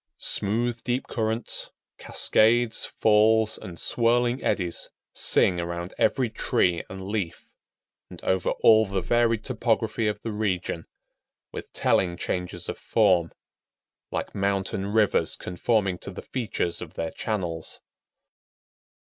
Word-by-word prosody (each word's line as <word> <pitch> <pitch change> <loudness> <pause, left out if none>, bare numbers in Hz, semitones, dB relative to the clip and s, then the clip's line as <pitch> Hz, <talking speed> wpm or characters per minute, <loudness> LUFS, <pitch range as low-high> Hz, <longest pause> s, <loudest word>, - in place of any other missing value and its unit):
Smooth, 115 +3 -2
deep 125 +1 -1
currents, 110 0 -1 0.3
cascades, 115 +1 +3
falls, 110 0 +3
and 85 -3 -9
swirling 120 +1 +1
eddies, 90 -4 -1 0.2
sing 90 -2 +3
around 85 +1 -4
every 125 +3 +2
tree 90 -5 +1
and 95 -2 -7
leaf, 100 -3 -4 0.6
and - - -10
over 95 0 +1
all 110 -1 +7
the 95 -1 -1
varied 115 -1 +2
topography 115 -3 0
of 105 -1 -1
the 115 - -3
region 95 -6 -2 0.6
with - - -8
telling 85 -2 +1
changes 90 0 -4
of - - -5
form, 85 -3 +2 0.8
like - - -4
mountain 100 0 -1
rivers 105 -6 +2
conforming 95 0 0
to - - -7
the 95 - -8
features 110 -8 -2
of - - -9
their 80 -1 -3
channels. 85 -7 -4
105 Hz, 120 wpm, -26 LUFS, 90-115 Hz, 0.8 s, all